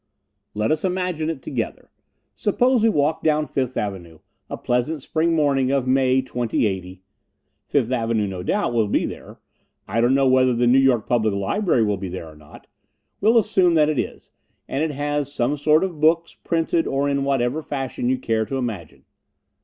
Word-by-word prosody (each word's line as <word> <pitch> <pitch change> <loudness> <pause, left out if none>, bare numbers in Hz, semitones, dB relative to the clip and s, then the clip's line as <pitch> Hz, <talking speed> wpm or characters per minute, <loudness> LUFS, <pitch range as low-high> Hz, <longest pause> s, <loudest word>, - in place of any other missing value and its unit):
Let 105 +6 0
us 155 0 0
imagine 180 -4 -1
it 155 -5 -5
together. 120 -5 -5 0.4
Suppose 245 +4 +1
we 225 - +4
walk 155 -4 +1
down 155 -1 +1
Fifth 130 -3 -3
Avenue, 90 -5 -4 0.3
a - - -5
pleasant 125 +4 -1
spring 165 +2 0
morning 140 -4 +2
of 135 -2 +1
May, 130 0 +2
2080. 95 -7 -2 0.6
Fifth 130 -4 0
Avenue, 115 -3 0
no 95 -2 -5
doubt, 200 - -1
will 115 -3 +2
be - - +1
there. - - -9 0.5
I 115 - 0
don't 120 +3 +3
know 135 -1 +3
whether 130 -1 +3
the 120 +1 +1
New 125 +2 +5
York 130 -5 +3
Public 110 -4 +1
Library 120 - +1
will 105 -2 0
be 95 -1 -5
there 90 -2 -7
or 80 - -13
not. 75 -1 -16 0.5
We'll 225 +4 +4
assume 190 -5 +3
that 155 -1 +4
it 155 - 0
is, - - -5 0.4
and 135 - -2
that 160 - 0
it - - -5
has 145 0 -2
some 140 0 0
sort 150 +3 +3
of 180 -5 -4
books, 165 +2 +2
printed, 165 0 -1
or 140 +1 0
in 140 -1 0
whatever 135 +1 0
fashion 135 -4 -3
you 130 - +1
care 110 -3 -1
to 135 - -4
imagine. 85 - -6
135 Hz, 185 wpm, -22 LUFS, 115-155 Hz, 0.6 s, New